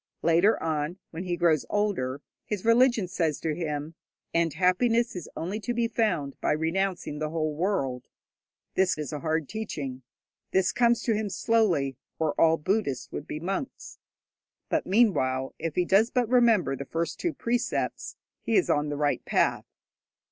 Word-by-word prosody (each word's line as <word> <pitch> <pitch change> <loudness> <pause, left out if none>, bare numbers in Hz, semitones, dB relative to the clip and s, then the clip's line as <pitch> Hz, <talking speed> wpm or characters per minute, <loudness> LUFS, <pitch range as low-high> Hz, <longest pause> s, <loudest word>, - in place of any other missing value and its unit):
Later 175 +6 +4
on, 155 +2 -1
when 170 +3 -6
he 175 -1 -1
grows 165 -4 +3
older, 165 -11 -1 0.2
his 210 -1 -3
religion 230 -3 +4
says 165 -4 -1
to 160 -2 -1
him, 150 -1 -4 0.4
'And 165 -1 +2
happiness 210 - +2
is 180 - -6
only 190 +6 -3
to 240 +2 -3
be 235 0 +1
found 210 -12 0
by - - +2
renouncing 165 0 -1
the 155 0 -2
whole 155 -1 -1
world.' 145 -7 -1 0.7
This 190 -1 +2
is 150 -2 -5
a 150 - -3
hard 160 -1 -1
teaching. 145 -12 -5 0.5
This 190 -2 +2
comes 235 +2 +2
to 230 - +2
him 210 -1 -1
slowly, 180 - +1 0.2
or 160 -2 0
all 165 0 +5
Buddhists 160 - -1
would 145 - -6
be 150 - -4
monks; 195 - -5 0.7
but, - - 0
meanwhile, 135 - +2
if 165 -1 -3
he 180 - +2
does 200 +6 +4
but 245 -2 +1
remember 230 - +3
the 140 - -6
first 165 +4 -3
two 345 -3 -1
precepts, 240 +1 -2 0.3
he 230 - -1
is 190 - +3
on 145 0 +1
the 145 - -3
right 145 -1 0
path. - - +1
175 Hz, 165 wpm, -27 LUFS, 150-215 Hz, 0.7 s, all